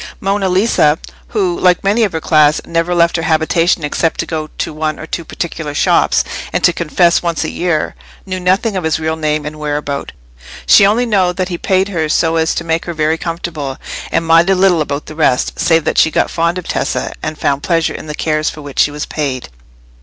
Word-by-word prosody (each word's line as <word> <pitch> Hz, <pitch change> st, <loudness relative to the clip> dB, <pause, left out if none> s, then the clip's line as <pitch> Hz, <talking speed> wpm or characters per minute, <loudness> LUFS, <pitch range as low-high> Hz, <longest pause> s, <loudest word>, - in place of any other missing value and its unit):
Monna 195 Hz, 0 st, 0 dB
Lisa, 180 Hz, -6 st, +3 dB, 0.3 s
who, 190 Hz, -6 st, -1 dB
like 180 Hz, -1 st, +3 dB
many 205 Hz, +4 st, +2 dB
of 205 Hz, -, +1 dB
her 160 Hz, -, -2 dB
class, 155 Hz, -2 st, +3 dB
never 170 Hz, +1 st, 0 dB
left 170 Hz, 0 st, +3 dB
her -, -, -2 dB
habitation 165 Hz, +1 st, +1 dB
except 160 Hz, +2 st, -1 dB
to -, -, 0 dB
go 155 Hz, -2 st, -4 dB
to -, -, -3 dB
one 155 Hz, 0 st, -2 dB
or -, -, -8 dB
two 170 Hz, -, -4 dB
particular 160 Hz, -2 st, -5 dB
shops, -, -, +3 dB, 0.3 s
and -, -, -1 dB
to 175 Hz, -, +4 dB
confession 170 Hz, +1 st, +2 dB
once 170 Hz, -2 st, -1 dB
a -, -, -3 dB
year, 170 Hz, -3 st, -1 dB, 0.3 s
knew 185 Hz, -1 st, -4 dB
nothing 190 Hz, +4 st, +1 dB
of 185 Hz, -, -2 dB
his 160 Hz, 0 st, 0 dB
real 160 Hz, 0 st, -1 dB
name 155 Hz, -1 st, -1 dB
and 155 Hz, +1 st, -6 dB
whereabout: 145 Hz, -1 st, -3 dB, 0.5 s
she 200 Hz, -, +7 dB
only 230 Hz, +4 st, +2 dB
know 195 Hz, -6 st, +2 dB
that 185 Hz, 0 st, -3 dB
he 175 Hz, -, -3 dB
paid 190 Hz, +1 st, +1 dB
her 160 Hz, -5 st, -1 dB
so 165 Hz, +1 st, +2 dB
as 160 Hz, 0 st, +1 dB
to -, -, -2 dB
make 165 Hz, 0 st, -1 dB
her 170 Hz, -, -5 dB
very 155 Hz, +1 st, 0 dB
comfortable, 165 Hz, -5 st, -4 dB, 0.3 s
and 165 Hz, -, 0 dB
minded 165 Hz, +4 st, +4 dB
little 185 Hz, -3 st, +3 dB
about 145 Hz, -1 st, -3 dB
the -, -, -9 dB
rest, 145 Hz, -5 st, 0 dB
save 165 Hz, -2 st, +3 dB
that -, -, +1 dB
she -, -, +5 dB
got -, -, 0 dB
fond 170 Hz, +1 st, 0 dB
of 180 Hz, -, -6 dB
Tessa, -, -, -2 dB
and 155 Hz, 0 st, -4 dB
found 140 Hz, -1 st, 0 dB
pleasure 165 Hz, -1 st, 0 dB
in -, -, -8 dB
the 150 Hz, -, -5 dB
cares 155 Hz, -1 st, 0 dB
for 150 Hz, -, -9 dB
which 145 Hz, -2 st, -7 dB
she -, -, +5 dB
was 150 Hz, 0 st, -5 dB
paid. 135 Hz, -5 st, -3 dB
165 Hz, 220 wpm, -15 LUFS, 155-180 Hz, 0.5 s, she